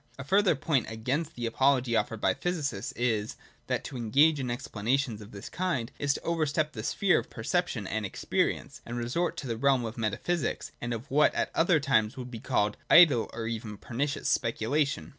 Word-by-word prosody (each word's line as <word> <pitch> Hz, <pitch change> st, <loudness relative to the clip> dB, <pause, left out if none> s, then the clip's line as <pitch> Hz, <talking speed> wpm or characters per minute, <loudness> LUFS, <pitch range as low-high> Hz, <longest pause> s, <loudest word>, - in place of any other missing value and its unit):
A 130 Hz, -, -6 dB
further 190 Hz, +5 st, +3 dB
point 135 Hz, -2 st, 0 dB
against 130 Hz, +9 st, -2 dB
the 120 Hz, -, -3 dB
apology 130 Hz, 0 st, +2 dB
offered 115 Hz, -1 st, 0 dB
by 95 Hz, -2 st, +2 dB
the -, -, -18 dB
physicists 145 Hz, -, -2 dB
is, 110 Hz, -3 st, -1 dB, 0.3 s
that, -, -, -1 dB
to -, -, -7 dB
engage 140 Hz, +7 st, +3 dB
in 130 Hz, -2 st, -2 dB
explanations 120 Hz, -1 st, -1 dB
of 105 Hz, -, -11 dB
this 100 Hz, -1 st, -9 dB
kind, 170 Hz, -10 st, -2 dB
is 145 Hz, 0 st, +1 dB
to -, -, -6 dB
overstep 155 Hz, -2 st, 0 dB
the 110 Hz, -, -5 dB
sphere 195 Hz, -, +2 dB
of -, -, -8 dB
perception 125 Hz, -, -1 dB
and 110 Hz, +3 st, -2 dB
experience, 95 Hz, -, -2 dB
and 120 Hz, -, -6 dB
resort 125 Hz, +9 st, -1 dB
to 135 Hz, -, -5 dB
the 115 Hz, -2 st, -2 dB
realm 135 Hz, -1 st, +2 dB
of 115 Hz, +2 st, -6 dB
metaphysics 115 Hz, +10 st, -2 dB
and 120 Hz, -, -3 dB
of 115 Hz, +4 st, -5 dB
what 150 Hz, +2 st, +4 dB
at -, -, 0 dB
other 165 Hz, -1 st, +3 dB
times 130 Hz, -4 st, +1 dB
would 125 Hz, -1 st, -7 dB
be 115 Hz, -, -6 dB
called 105 Hz, -1 st, 0 dB
idle 150 Hz, -10 st, +7 dB
or 115 Hz, 0 st, -5 dB
even 110 Hz, -2 st, -4 dB
pernicious 140 Hz, +7 st, -3 dB
speculation. 140 Hz, +5 st, 0 dB
125 Hz, 195 wpm, -29 LUFS, 110-150 Hz, 0.3 s, idle